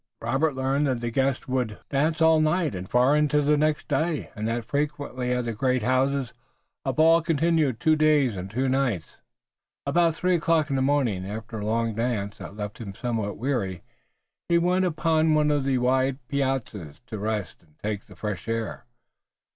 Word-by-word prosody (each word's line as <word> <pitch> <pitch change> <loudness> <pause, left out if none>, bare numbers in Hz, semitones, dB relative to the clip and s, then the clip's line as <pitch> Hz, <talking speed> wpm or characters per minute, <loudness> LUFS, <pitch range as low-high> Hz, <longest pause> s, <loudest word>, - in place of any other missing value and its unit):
Robert 135 +4 0
learned 135 +2 +1
that 130 -3 0
the 120 0 -3
guests 135 +2 0
would 125 -4 -1
dance 155 +3 +1
all 160 -1 +5
night 155 -1 +1
and 95 0 -6
far 125 +4 +4
into 150 0 +3
the 150 +1 +3
next 150 0 0
day, 155 +2 -1
and 110 0 -3
that 115 0 -2
frequently 140 -3 -2
at 125 -1 0
the 115 - -2
great 125 +1 0
houses 130 +1 +1 0.5
a - - 0
ball 165 +1 +5
continued 160 -5 +1
two 155 +5 +3
days 150 -6 +3
and 95 +1 -6
two 130 +6 -1
nights. 130 - -1 0.7
About 165 +3 +2
three 180 +2 +1
o'clock 160 -2 +1
in - - +1
the 135 - +1
morning, 130 -9 +1
after 110 +3 -6
a 105 - -4
long 115 0 0
dance 110 -3 -2
that 100 - -9
left 105 -1 -6
him 100 -4 -7
somewhat 110 -2 -3
weary, 105 -8 -2 0.7
he 170 - +4
went 180 +2 +2
upon 160 -2 +2
one 150 -1 +3
of 145 -2 0
the 135 -1 +2
wide 130 +1 +1
piazzas 130 - -2
to 110 -3 -6
rest 105 -1 -3
and 75 -3 -29
take 105 -1 -4
the - - -14
fresh 105 -3 -5
air. 115 -1 -3
130 Hz, 185 wpm, -25 LUFS, 115-150 Hz, 0.7 s, all